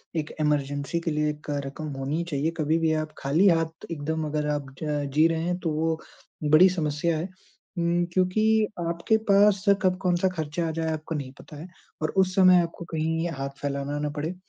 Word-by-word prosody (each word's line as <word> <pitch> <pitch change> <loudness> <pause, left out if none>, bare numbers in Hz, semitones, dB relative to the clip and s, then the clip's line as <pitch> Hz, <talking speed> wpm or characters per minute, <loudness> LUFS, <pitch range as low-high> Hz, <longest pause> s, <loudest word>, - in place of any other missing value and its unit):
एक 155 -1 -3
इमर्जेन्सी 145 +1 0
के 165 -1 -2
लिए 150 0 +1
एक 150 0 -7 0.2
रकम 155 +3 -6
होनी 135 +4 -2
ही 170 - -1
चाहिए। 145 +3 0
कभी 155 +1 +1
भी 160 -1 +2
आप 155 - -10
खाली 160 +9 +2
हाथ 165 -1 0
एकदम 160 0 -2
अगर 150 0 -1
आप 145 -1 -4 0.2
ज 150 -1 -1
जी 155 +2 +5
रहे 165 -1 -1
हैं, 180 +1 -1
तो 165 -3 -2
वो 160 +1 0 0.4
बड़ी 155 +5 +6
समस्या 160 -1 -1
है 175 +4 -4 0.5
उम, 170 +1 +1
क्योंकि 215 +4 +3 0.2
आपके 170 +6 +1
पास 200 0 +5 0.2
कब 185 -1 +2
कौन-सा 180 0 +2
खर्चा 160 +2 -2
आ - - -1
जाए, 160 0 -2
आपको 155 +1 -5
नहीं 135 -3 -4
पता 150 - -12
है, 165 +5 -8 0.3
और 155 - 0
उस 185 -1 +3
समय 185 -2 +7
आपको 170 0 -5
कहीं 160 +1 -1
हाथ 135 0 -3
फैलाना 140 0 -2
ना 150 0 -1
पड़े, 160 +5 -2
160 Hz, 200 wpm, -26 LUFS, 150-175 Hz, 0.5 s, समय